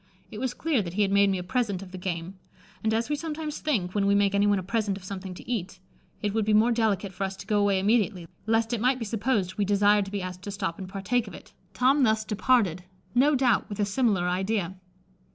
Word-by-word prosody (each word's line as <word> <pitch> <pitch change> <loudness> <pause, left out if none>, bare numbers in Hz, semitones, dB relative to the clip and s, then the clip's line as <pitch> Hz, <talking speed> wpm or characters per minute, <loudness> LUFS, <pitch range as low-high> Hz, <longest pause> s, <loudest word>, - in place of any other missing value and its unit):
It 210 - -7
was 255 0 -2
clear 305 -8 +1
that 175 -2 -6
he 210 - +3
had 195 - 0
made 200 0 +4
me 190 - 0
a 180 - -4
present 200 -2 -1
of 185 - -12
the 185 - -7
game; 180 +1 -5 0.4
and, 220 - +1
as 225 +1 0
we 295 - 0
sometimes 305 -1 -5
think, 200 -13 -1
when 200 -1 +1
we 200 - +4
make 200 -1 +3
anyone 205 0 +3
a 190 - -3
present 205 0 -1
of 195 - -13
something 185 -1 -6
to - - -12
eat, 195 -6 -3 0.4
it 205 -1 0
would 220 0 +1
be 210 0 +2
more 225 +3 +4
delicate 210 -4 0
for 190 +2 -4
us 190 0 -3
to - - -10
go 210 -1 +1
away 200 -1 +3
immediately, 200 -3 +1 0.2
lest 225 +1 +1
it 230 - -1
might 255 +2 +3
be 230 - -4
supposed 210 -4 -1
we - - +3
desired 205 +1 +3
to 195 - -9
be 200 -2 -3
asked 180 0 -6
to 205 - -7
stop 195 -4 -3
and 185 -1 -7
partake 205 +5 -1
of 195 - -9
it, - - -14 0.2
Tom 265 +6 +3
thus 220 -3 +2
departed, 210 -5 +1 0.3
no 280 +4 +4
doubt 250 -4 +2
with 205 - -6
a 205 - +3
similar 200 -4 +1
idea. 190 0 -1
205 Hz, 250 wpm, -27 LUFS, 190-230 Hz, 0.4 s, made